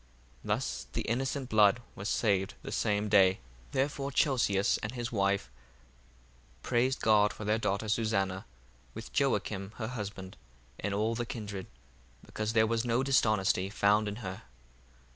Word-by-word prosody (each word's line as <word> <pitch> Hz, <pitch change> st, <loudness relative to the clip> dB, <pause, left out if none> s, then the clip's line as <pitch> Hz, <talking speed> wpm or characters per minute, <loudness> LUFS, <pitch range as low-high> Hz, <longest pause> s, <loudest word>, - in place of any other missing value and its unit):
Thus -, -, -2 dB
the -, -, -1 dB
innocent 130 Hz, +3 st, -2 dB
blood 105 Hz, +1 st, +5 dB
was 95 Hz, +2 st, -5 dB
saved 100 Hz, -4 st, +1 dB
the -, -, -6 dB
same 105 Hz, 0 st, 0 dB
day. 95 Hz, -3 st, +6 dB, 0.4 s
1:63 -, -, -25 dB
Therefore 140 Hz, +1 st, -1 dB
Chelcias 115 Hz, -9 st, +2 dB
and 105 Hz, +3 st, -4 dB
his 120 Hz, -1 st, -4 dB
wife 100 Hz, -, 0 dB, 1.1 s
praised 130 Hz, +2 st, +1 dB
God 105 Hz, -1 st, +4 dB
for 110 Hz, -, -8 dB
their 105 Hz, +2 st, +1 dB
daughter 100 Hz, 0 st, -1 dB
Susanna, 100 Hz, -3 st, 0 dB, 0.5 s
with -, -, -8 dB
Joacim 100 Hz, 0 st, 0 dB
her 110 Hz, -2 st, -4 dB
husband, 100 Hz, -5 st, -6 dB, 0.4 s
and 100 Hz, +1 st, -2 dB
all 110 Hz, +3 st, +1 dB
the 120 Hz, 0 st, -3 dB
kindred, 105 Hz, -6 st, -6 dB, 0.6 s
because 105 Hz, +1 st, -3 dB
there 110 Hz, -1 st, +5 dB
was 115 Hz, 0 st, 0 dB
no 120 Hz, +1 st, +1 dB
dishonesty 110 Hz, -8 st, +2 dB
found 105 Hz, +1 st, +2 dB
in 105 Hz, -, -3 dB
her. 95 Hz, 0 st, -5 dB
105 Hz, 145 wpm, -31 LUFS, 100-115 Hz, 1.1 s, day